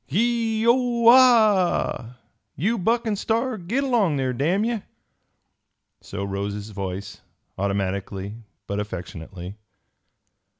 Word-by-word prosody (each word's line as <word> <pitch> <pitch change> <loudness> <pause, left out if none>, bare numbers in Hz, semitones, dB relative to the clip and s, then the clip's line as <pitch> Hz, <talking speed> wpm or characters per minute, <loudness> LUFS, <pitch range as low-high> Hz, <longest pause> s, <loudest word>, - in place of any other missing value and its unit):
"Gee 225 - +1
whoa 235 -1 +5
haw! 215 - +4 0.4
You 215 - 0
Buck 230 +6 +1
an' 220 -2 0
Star, 230 +5 -1
git 230 +11 -1
along 225 - +2
there, 130 -2 -1
damn 175 - +1
ye!" 230 -2 -1 1.2
So 100 - -6
rose 100 +1 -3
his 105 +1 -7
voice, 95 0 -6 0.3
automatically 100 0 -2 0.3
but 100 +1 -3
affectionately. 90 -1 -7
175 Hz, 110 wpm, -24 LUFS, -, 1.2 s, whoa